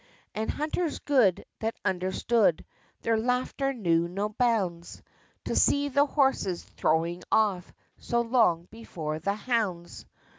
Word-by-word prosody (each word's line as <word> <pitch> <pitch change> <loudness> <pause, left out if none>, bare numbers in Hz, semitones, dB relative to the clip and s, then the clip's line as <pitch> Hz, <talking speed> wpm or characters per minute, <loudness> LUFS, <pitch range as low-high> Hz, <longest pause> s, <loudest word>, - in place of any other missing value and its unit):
And 220 +1 -3
hunters 310 +2 -2
good, 245 -11 +2
that 225 +1 -2
understood, 190 +1 +1 0.4
Their 225 -1 +2
laughter 250 +3 0
knew 170 -9 +1
no 200 +4 -2
bounds, 205 -7 -1 0.4
To - - -2
see 285 0 +3
the 280 +2 +3
horses 265 - +1
"throwing 165 +2 -1
off," 200 -5 +1 0.3
So 235 0 0
long 225 -8 +2
before 160 -9 -5
the 200 +5 -1
hounds. 210 -7 -2
215 Hz, 120 wpm, -27 LUFS, 175-250 Hz, 0.4 s, see